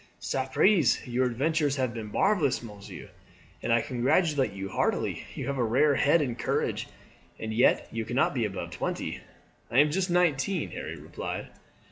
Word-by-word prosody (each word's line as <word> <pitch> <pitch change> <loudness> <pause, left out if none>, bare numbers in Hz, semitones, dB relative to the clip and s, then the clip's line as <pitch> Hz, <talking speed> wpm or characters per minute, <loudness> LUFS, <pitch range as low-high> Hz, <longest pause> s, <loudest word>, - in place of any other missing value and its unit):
"Sapriste, 135 - +2
your 125 +1 +1
adventures 145 +4 0
have 130 -4 -1
been 110 -3 -6
marvellous, 150 - +2
monsieur, 105 -3 -10 0.5
and - - -2
I 115 - +4
congratulate 140 - +1
you 95 0 -5
heartily. 95 - -1
You - - -4
have 140 -1 -2
a - - +3
rare 130 +6 +3
head 145 +4 +3
and 120 -3 -4
courage, - - -1 0.5
and 110 0 -4
yet 120 +4 +3
you 115 0 -3
cannot 120 +4 +1
be 125 -4 0
above 95 -5 -4
twenty." 85 - -3 0.5
"I 120 - -1
am 145 +2 +6
just 185 +3 0
nineteen," 175 0 +1
Harry - - -6
replied. - - -6
130 Hz, 160 wpm, -28 LUFS, 115-150 Hz, 0.5 s, am